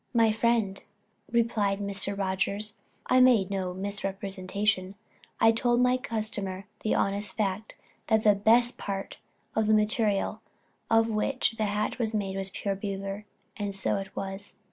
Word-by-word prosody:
"My 225 -1 +5
friend," 220 -3 +1 0.5
replied 225 -4 +1
Mr. 200 0 -1
Rogers, 200 +2 -1 0.3
"I 255 - +4
made 230 -7 +5
no 190 -2 -1
misrepresentation, 195 0 -2 0.4
I 225 - +6
told 240 +1 +2
my 250 0 +4
customer 210 -5 -4 0.2
the 215 - +1
honest 200 0 0
fact, 210 0 -2 0.3
that 220 -1 +3
the 210 - +6
best 235 +4 +3
part 195 -1 -5 0.4
of 220 -1 +2
the 215 - +5
material 215 -2 +1 0.5
of 225 0 +4
which 230 +5 0
the 215 - +2
hat 210 +4 -1
was 225 -2 0
made 195 -2 -2
was 195 0 -3
pure 195 +1 -2
beaver, 195 +1 -5 0.3
and 205 -2 -3
so 195 - 0
it 195 -1 -7
was." 195 +1 -4
205 Hz, 145 wpm, -28 LUFS, 195-220 Hz, 0.5 s, I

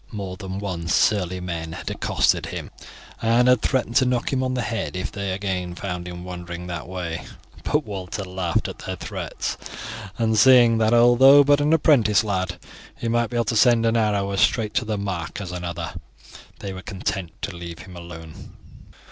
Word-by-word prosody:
More 100 -4 -5
than 95 -1 -6
once 85 -5 -2
surly 95 -3 +2
men 85 -3 -5
had 85 - -5
accosted - - +1
him, - - -6 0.5
and 115 +2 +3
had 125 -3 +5
threatened 120 -3 +1
to 130 - +5
knock 125 +1 0
him 130 - +1
on 130 0 -1
the 125 - -1
head 110 -3 -3
if 90 - -3
they 100 -1 -3
again 95 -2 -3
found 90 -2 -5
him 90 0 -7
wandering 90 -1 -7
that 85 -2 -5
way; 90 -3 -4 0.4
but 150 -1 0
Walter 95 -1 -5
laughed 90 -2 -1
at - - -8
their - - -5
threats, - - -4 0.6
and 110 -2 +2
seeing, 120 -2 +7
that 110 -1 +3
though 120 +4 +7
but 145 +1 +4
an 150 +1 +2
apprentice 125 -11 +4
lad, 95 -3 -2 0.4
he 115 - -3
might 120 -1 +1
be 120 - -3
able 115 - +1
to 115 - -1
send 115 0 +5
an 115 0 +2
arrow 105 -3 +1
as 100 - 0
straight 110 -3 +2
to 125 - 0
the 110 -1 -2
mark 95 -4 -4
as 95 -3 -6
another, 85 -1 -5 0.6
they 100 -1 -6
were 95 - -7
content 95 -3 -4
to 100 - -3
leave 85 -1 -7
him 90 - -12
alone. 85 -2 -10
100 Hz, 190 wpm, -23 LUFS, 90-115 Hz, 0.6 s, seeing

